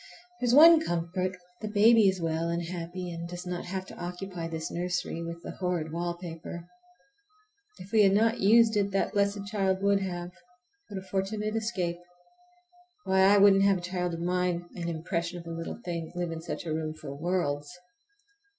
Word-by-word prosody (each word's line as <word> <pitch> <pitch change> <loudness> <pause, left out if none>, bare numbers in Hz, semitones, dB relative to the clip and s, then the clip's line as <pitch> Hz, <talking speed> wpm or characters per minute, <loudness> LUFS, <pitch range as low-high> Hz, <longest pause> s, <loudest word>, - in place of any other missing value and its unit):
There's 245 0 +2
one 320 +2 +9
comfort, 180 - -2 0.2
the 215 - -3
baby 215 +1 +5
is 190 -1 -2
well 165 0 -1
and 170 0 -1
happy, 175 +1 -5
and 170 0 -6
does 175 +1 -7
not 180 -1 -4
have 190 +1 -4
to - - -12
occupy 180 -1 -5
this 160 -1 -5
nursery 175 -1 -2
with 170 0 -6
the - - -6
horrid 175 -4 -2
wallpaper. 170 0 -5 1.1
If 190 - -12
we 220 - +5
had 195 -1 +5
not 225 +3 +3
used 220 +2 +5
it 200 -1 +2
that 195 - 0
blessed 200 -1 0
child 195 -2 0
would 200 0 +3
have! 175 -2 -4 0.6
What 200 - -6
a - - -18
fortunate 210 +3 -2
escape! 190 -7 -2 1.0
Why, 190 0 +1
I 195 +2 +6
wouldn't 195 -1 +6
have 195 -1 +4
a - - -7
child 180 -1 -2
of 165 - -6
mine, 180 0 0
an 170 -1 -4
impressionable 170 0 -4
little 165 0 -5
thing, 170 -2 -4
live 175 -1 -2
in 165 0 -5
such 170 - -5
a 160 - -2
room 155 0 -3
for 145 -3 -8
worlds. 145 -2 -1
180 Hz, 180 wpm, -28 LUFS, 170-195 Hz, 1.1 s, one